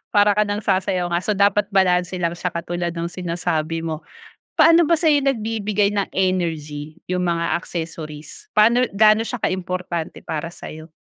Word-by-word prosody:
Para 205 Hz, 0 st, +6 dB
ka 210 Hz, +1 st, +2 dB
nang 205 Hz, +1 st, -3 dB
sayaw 185 Hz, -2 st, 0 dB
nga, 170 Hz, -, +2 dB
so 210 Hz, +3 st, -1 dB
dapat 200 Hz, +1 st, +3 dB
balanse 180 Hz, -2 st, +2 dB
lang 170 Hz, -2 st, -1 dB
siya 180 Hz, +1 st, -3 dB
katulad 175 Hz, +1 st, -3 dB
nung 170 Hz, +1 st, -3 dB
sinasabi 165 Hz, -2 st, -2 dB
mo. 160 Hz, -2 st, -3 dB, 0.6 s
Paano 330 Hz, -1 st, +6 dB
ba 335 Hz, -, +4 dB
sa'yo 310 Hz, -3 st, +3 dB
nagbibigay 215 Hz, -6 st, 0 dB
ng 200 Hz, -1 st, -1 dB
energy 160 Hz, -5 st, -2 dB
yung 180 Hz, 0 st, 0 dB
mga 170 Hz, 0 st, 0 dB
accessories? 160 Hz, -3 st, -7 dB
Paano 235 Hz, +4 st, +5 dB
gaano 215 Hz, +1 st, +5 dB
siya 245 Hz, -, -3 dB
ka-importante 180 Hz, -2 st, -3 dB
para 160 Hz, +1 st, -4 dB
sa'yo? 160 Hz, -1 st, -10 dB
180 Hz, 155 wpm, -21 LUFS, 170-210 Hz, 0.6 s, Para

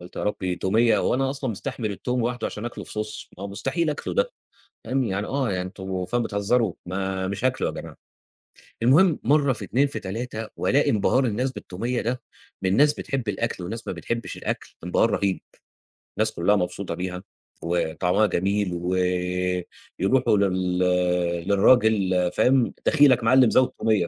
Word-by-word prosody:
قُلت 90 Hz, +1 st, -13 dB
يا -, -, -3 dB
ربي، 95 Hz, -3 st, -2 dB
توميّة! 110 Hz, +4 st, +3 dB
هو -, -, +1 dB
أنا 135 Hz, +1 st, +1 dB
أصلًا 135 Hz, -2 st, -3 dB
مستحمل 115 Hz, +1 st, -4 dB
التوم 125 Hz, +5 st, -2 dB
واحده 120 Hz, 0 st, -2 dB
عشان 105 Hz, -, -6 dB
أكلة، 120 Hz, -, -6 dB
في -, -, -8 dB
صوص! 105 Hz, 0 st, -5 dB
ما 95 Hz, -, -6 dB
هو -, -, -4 dB
مستحيل 155 Hz, -, -1 dB
أكله 145 Hz, -, -4 dB
ده، -, -, +1 dB, 0.6 s
فاهم 130 Hz, 0 st, 0 dB
يعني 100 Hz, -1 st, -2 dB
آه 135 Hz, -3 st, -1 dB
يعني 90 Hz, -2 st, -1 dB
أنتم 95 Hz, 0 st, -5 dB
فعلًا 120 Hz, +5 st, 0 dB
بتهزروا، 105 Hz, 0 st, +1 dB
ما 95 Hz, +1 st, -2 dB
مش 100 Hz, +5 st, -3 dB
هاكله 130 Hz, -, +1 dB
يا -, -, -3 dB
جماعة. -, -, -8 dB, 0.9 s
المهم، 155 Hz, +8 st, +5 dB
مرّه 145 Hz, -1 st, +3 dB
في 110 Hz, -4 st, -5 dB
2 125 Hz, +9 st, +2 dB
في 140 Hz, -, -5 dB
3، 110 Hz, +3 st, -5 dB
وألاقي 140 Hz, +2 st, +2 dB
انبهار 115 Hz, +5 st, +2 dB
الناس 125 Hz, +3 st, -1 dB
بالتومية 115 Hz, +3 st, -3 dB
ده، 125 Hz, +2 st, -2 dB, 0.4 s
من 95 Hz, +1 st, +1 dB
ناس 150 Hz, +1 st, +5 dB
بتحب 130 Hz, -6 st, -4 dB
الأكل 95 Hz, -2 st, -2 dB
وناس 110 Hz, +6 st, -5 dB
ما -, -, -2 dB
بتحبش 115 Hz, 0 st, -4 dB
الأكل، -, -, -5 dB
انبهار 90 Hz, +5 st, +2 dB
رهيب، 100 Hz, -2 st, 0 dB, 0.8 s
الناس -, -, +2 dB
كلها 95 Hz, +5 st, +2 dB
مبسوطة 90 Hz, -1 st, -2 dB
بيها، 90 Hz, +1 st, -5 dB, 0.4 s
وطعمها 90 Hz, +4 st, +1 dB
جميل، 100 Hz, 0 st, 0 dB
و 90 Hz, +1 st, -2 dB, 1.0 s
يروحوا 120 Hz, +1 st, +3 dB
لل 95 Hz, -2 st, 0 dB, 0.7 s
للراجل، 100 Hz, -4 st, +3 dB
فاهم، 130 Hz, -2 st, +3 dB
دخيلك 145 Hz, -6 st, +5 dB
معلّم 125 Hz, +1 st, +5 dB
زود 130 Hz, 0 st, +4 dB
تومية، 105 Hz, -6 st, +2 dB
110 Hz, 165 wpm, -24 LUFS, 95-125 Hz, 1.0 s, المهم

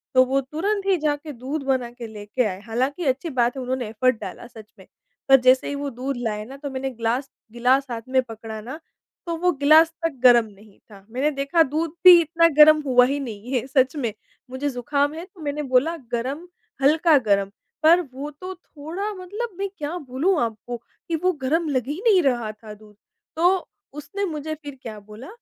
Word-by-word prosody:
तो 255 Hz, -, +7 dB
वो 270 Hz, +2 st, +1 dB
तुरंत 390 Hz, +9 st, -2 dB
ही 390 Hz, -2 st, +3 dB
जाके 300 Hz, -1 st, -2 dB
दूध 275 Hz, +3 st, -5 dB
बना 260 Hz, -3 st, 0 dB
के 240 Hz, -1 st, -9 dB
लेके 215 Hz, +3 st, -3 dB
आए, 190 Hz, -3 st, -3 dB
हालाँकि 260 Hz, +9 st, -2 dB
अच्छी 275 Hz, +5 st, 0 dB
बात 245 Hz, -2 st, 0 dB
उन्होंने 255 Hz, -2 st, -3 dB
एफ़र्ट 230 Hz, +1 st, +1 dB
डाला -, -, -8 dB
सच 220 Hz, -3 st, -15 dB
में, -, -, -16 dB, 0.4 s
पर 270 Hz, -, +9 dB
जैसे 255 Hz, +1 st, +4 dB
ही 285 Hz, -, -3 dB
वो 280 Hz, 0 st, -3 dB
दूध 260 Hz, +2 st, -4 dB
लाए 215 Hz, -3 st, -3 dB
ना 265 Hz, +4 st, -10 dB
तो 285 Hz, 0 st, -6 dB
मैंने 265 Hz, 0 st, -3 dB
ग्लास 245 Hz, +2 st, -2 dB, 0.2 s
गिलास 250 Hz, +4 st, +2 dB
था 235 Hz, -2 st, -4 dB
में 260 Hz, 0 st, +3 dB
पकड़ा 225 Hz, -2 st, -8 dB
ना, 260 Hz, +8 st, -8 dB, 0.5 s
तो 340 Hz, -1 st, -2 dB
वो 360 Hz, +2 st, +2 dB
गिलास 310 Hz, +2 st, +5 dB, 0.2 s
तक 330 Hz, -, +1 dB
गरम 240 Hz, -2 st, +7 dB
नहीं 205 Hz, 0 st, -18 dB
था। 195 Hz, -1 st, -15 dB
मैंने 275 Hz, +5 st, 0 dB
देखा 280 Hz, +4 st, +2 dB
दूध 310 Hz, +3 st, -2 dB
भी 360 Hz, -1 st, +11 dB
इतना 335 Hz, +1 st, +3 dB
गरम 305 Hz, 0 st, +8 dB
हुआ 250 Hz, -2 st, +5 dB
ही 280 Hz, +3 st, -1 dB
नहीं 235 Hz, -3 st, -7 dB
है 250 Hz, -2 st, 0 dB
सच 260 Hz, +1 st, +2 dB
में, 235 Hz, -7 st, -2 dB, 0.4 s
मुझे 260 Hz, +3 st, -3 dB
ज़ुकाम 285 Hz, +3 st, -1 dB
है 330 Hz, +2 st, -7 dB
तो 370 Hz, -2 st, -18 dB
मैंने 295 Hz, 0 st, -3 dB
बोला 270 Hz, +6 st, +2 dB, 0.2 s
गरम, 265 Hz, +8 st, -3 dB, 0.3 s
हल्का 310 Hz, +2 st, +5 dB
गरम, 200 Hz, -1 st, +2 dB, 0.3 s
पर 335 Hz, +3 st, +6 dB
वो 280 Hz, +3 st, -6 dB
तो 365 Hz, +6 st, -8 dB
थोड़ा 355 Hz, +5 st, -6 dB
मतलब 405 Hz, +4 st, -6 dB
मैं 395 Hz, 0 st, -2 dB
क्या 300 Hz, +3 st, -4 dB
बोलूँ 295 Hz, +5 st, 0 dB
आपको, 235 Hz, +1 st, -5 dB
कि 280 Hz, +7 st, -7 dB
वो 365 Hz, +3 st, +1 dB
गरम 320 Hz, +5 st, +1 dB
लग 255 Hz, -4 st, -1 dB
ही 300 Hz, +6 st, -4 dB
नहीं 395 Hz, -5 st, +6 dB
रहा 240 Hz, -5 st, 0 dB
था 215 Hz, 0 st, -12 dB
दूध। 210 Hz, 0 st, -17 dB, 0.4 s
तो 355 Hz, +3 st, +2 dB, 0.3 s
उसने 390 Hz, +8 st, -4 dB
मुझे 310 Hz, -2 st, -4 dB
फिर 290 Hz, -2 st, -10 dB
क्या 220 Hz, -4 st, -8 dB
बोला 210 Hz, +5 st, -12 dB
275 Hz, 200 wpm, -23 LUFS, 240-315 Hz, 0.5 s, भी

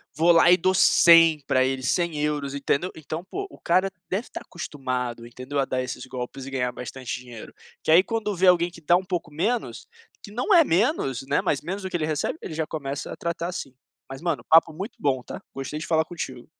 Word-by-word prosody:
vou 170 Hz, +2 st, +4 dB
lá 170 Hz, +1 st, +6 dB
e 180 Hz, -, +7 dB
dou 185 Hz, +2 st, +2 dB
100 165 Hz, -4 st, +6 dB
para 130 Hz, 0 st, +3 dB
ele, 130 Hz, 0 st, -1 dB
100€ 150 Hz, -2 st, -1 dB
entendeu? 140 Hz, +5 st, -1 dB
Então, 160 Hz, +2 st, -6 dB
pô, 395 Hz, -, -5 dB
o -, -, -15 dB
cara 185 Hz, +3 st, +2 dB, 0.2 s
deve 200 Hz, +6 st, -2 dB
estar -, -, -8 dB
acostumado, 125 Hz, -7 st, -5 dB
entendeu, 130 Hz, +4 st, -7 dB
a 135 Hz, -, +2 dB
dar 130 Hz, 0 st, -2 dB
esses 125 Hz, +1 st, -6 dB
golpes 130 Hz, +1 st, -6 dB
e 135 Hz, -, -8 dB
ganhar 125 Hz, -2 st, -1 dB
bastante 125 Hz, 0 st, -6 dB
dinheiro, 120 Hz, -3 st, -11 dB, 0.3 s
porque -, -, -7 dB
aí 175 Hz, +3 st, +7 dB
quando 215 Hz, -3 st, -2 dB
vê 185 Hz, +2 st, +1 dB
alguém 175 Hz, -1 st, +5 dB
que 170 Hz, -1 st, -14 dB
dá 170 Hz, +3 st, +4 dB
um 185 Hz, +1 st, 0 dB
pouco 175 Hz, -4 st, -3 dB
menos, 215 Hz, +10 st, -2 dB, 0.3 s
que 205 Hz, -, -11 dB
não 250 Hz, -, 0 dB
é 335 Hz, -2 st, +8 dB
menos, 170 Hz, -, 0 dB
né, 140 Hz, -, +2 dB
mas 145 Hz, -, 0 dB
menos 195 Hz, +3 st, -5 dB
do 190 Hz, -, -5 dB
que 180 Hz, -, -1 dB
ele 155 Hz, -, -1 dB
recebe, 155 Hz, -, -2 dB
ele 160 Hz, -, -6 dB
já 160 Hz, 0 st, -2 dB
começa 140 Hz, -2 st, -5 dB
a -, -, -5 dB
tratar 170 Hz, 0 st, -3 dB
assim. 140 Hz, -7 st, -6 dB, 0.4 s
Mas 135 Hz, +2 st, -8 dB
mano, 160 Hz, -9 st, -2 dB
papo 165 Hz, 0 st, +6 dB
muito 195 Hz, +8 st, -6 dB
bom, 130 Hz, -3 st, 0 dB
tá, -, -, -8 dB
gostei 135 Hz, +3 st, -5 dB
de -, -, -6 dB
falar 160 Hz, -1 st, +2 dB
contigo. 130 Hz, -8 st, -7 dB
160 Hz, 225 wpm, -25 LUFS, 135-180 Hz, 0.4 s, é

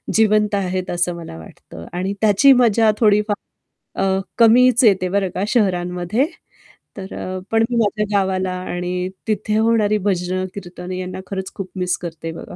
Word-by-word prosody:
जिवंत 215 Hz, -1 st, +3 dB
आहेत 185 Hz, -2 st, -2 dB
असं 175 Hz, 0 st, -1 dB
मला 165 Hz, -, -9 dB
वाटतं 80 Hz, +1 st, -12 dB
आणि 185 Hz, +3 st, -2 dB
त्याची 220 Hz, +6 st, +6 dB
मजा 225 Hz, -1 st, +4 dB
थोडीफार 210 Hz, -1 st, +3 dB, 0.7 s
अ, -, -, +2 dB, 0.3 s
कमीच 245 Hz, +2 st, +5 dB
येते 190 Hz, -5 st, +4 dB
बरं 195 Hz, 0 st, 0 dB
का 190 Hz, -, -1 dB
शहरांमध्ये 180 Hz, 0 st, 0 dB, 0.7 s
तर 190 Hz, -1 st, -7 dB
अ, 185 Hz, 0 st, -5 dB
पण 225 Hz, 0 st, +3 dB
मी 245 Hz, -, -2 dB
माझ्या 210 Hz, -1 st, +1 dB
गावाला 190 Hz, -1 st, 0 dB
आणि 180 Hz, 0 st, -3 dB, 0.2 s
तिथे 215 Hz, 0 st, -1 dB
होणारी 220 Hz, -2 st, +2 dB
भजनं, 185 Hz, -2 st, -1 dB
कीर्तनं 180 Hz, -1 st, -8 dB
यांना 185 Hz, 0 st, -5 dB
खरंच 190 Hz, -1 st, -5 dB
खूप 190 Hz, -2 st, -6 dB
मिस 180 Hz, -1 st, -1 dB
करते 165 Hz, -1 st, -6 dB
बघा. 165 Hz, -, -9 dB
190 Hz, 155 wpm, -20 LUFS, 180-215 Hz, 0.7 s, त्याची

